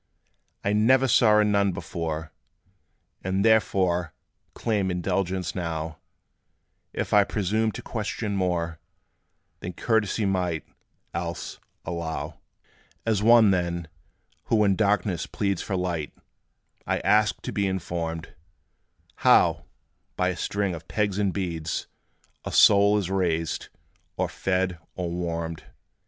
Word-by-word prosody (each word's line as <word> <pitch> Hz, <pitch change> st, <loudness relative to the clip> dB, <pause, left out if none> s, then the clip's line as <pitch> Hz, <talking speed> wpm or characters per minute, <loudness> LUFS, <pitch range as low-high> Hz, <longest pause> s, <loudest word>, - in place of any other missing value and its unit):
I 100 Hz, -, +1 dB
never 130 Hz, +5 st, +4 dB
saw 110 Hz, -2 st, +5 dB
a 105 Hz, -, +5 dB
Nun 100 Hz, -2 st, +2 dB
before; 80 Hz, -2 st, -4 dB, 0.9 s
And 95 Hz, +2 st, 0 dB
therefore 95 Hz, -6 st, +2 dB, 0.4 s
claim 105 Hz, -4 st, 0 dB
indulgence 90 Hz, 0 st, -1 dB
now, 80 Hz, -3 st, -4 dB, 0.9 s
If -, -, -3 dB
I 105 Hz, -1 st, +7 dB
presume 110 Hz, +3 st, 0 dB
to -, -, -7 dB
question 105 Hz, -1 st, -3 dB
more 85 Hz, -3 st, -1 dB, 0.8 s
Than 90 Hz, -, -6 dB
courtesy 110 Hz, +1 st, +1 dB
might, 90 Hz, -4 st, -1 dB, 0.5 s
else, 85 Hz, 0 st, -4 dB, 0.3 s
allow: 85 Hz, -1 st, -4 dB, 0.7 s
As 110 Hz, -3 st, +1 dB
one, 115 Hz, -1 st, +7 dB
then, 85 Hz, -2 st, -1 dB, 0.6 s
who 110 Hz, -2 st, +3 dB
in 100 Hz, -2 st, +3 dB
darkness 100 Hz, -4 st, +1 dB
pleads, 100 Hz, -3 st, -1 dB
For 95 Hz, -, -3 dB
light, 85 Hz, -5 st, -2 dB, 0.8 s
I -, -, +1 dB
ask 105 Hz, 0 st, +3 dB
to -, -, -4 dB
be 100 Hz, -1 st, 0 dB
informed 85 Hz, -3 st, -3 dB, 0.8 s
How, -, -, +4 dB, 0.5 s
by 90 Hz, 0 st, +1 dB
a 90 Hz, -, -2 dB
string 100 Hz, 0 st, -1 dB
of 80 Hz, -1 st, -8 dB
pegs 105 Hz, -2 st, 0 dB
and 100 Hz, -2 st, +2 dB
beads, 85 Hz, -5 st, -3 dB, 0.6 s
A -, -, -5 dB
soul 100 Hz, +1 st, +6 dB
is 95 Hz, -3 st, -2 dB
raised, 85 Hz, -4 st, -1 dB, 0.5 s
or -, -, +1 dB
fed, 90 Hz, -2 st, -1 dB, 0.2 s
or 90 Hz, -2 st, -3 dB
warmed. 85 Hz, -1 st, -3 dB
95 Hz, 120 wpm, -26 LUFS, 85-105 Hz, 0.9 s, I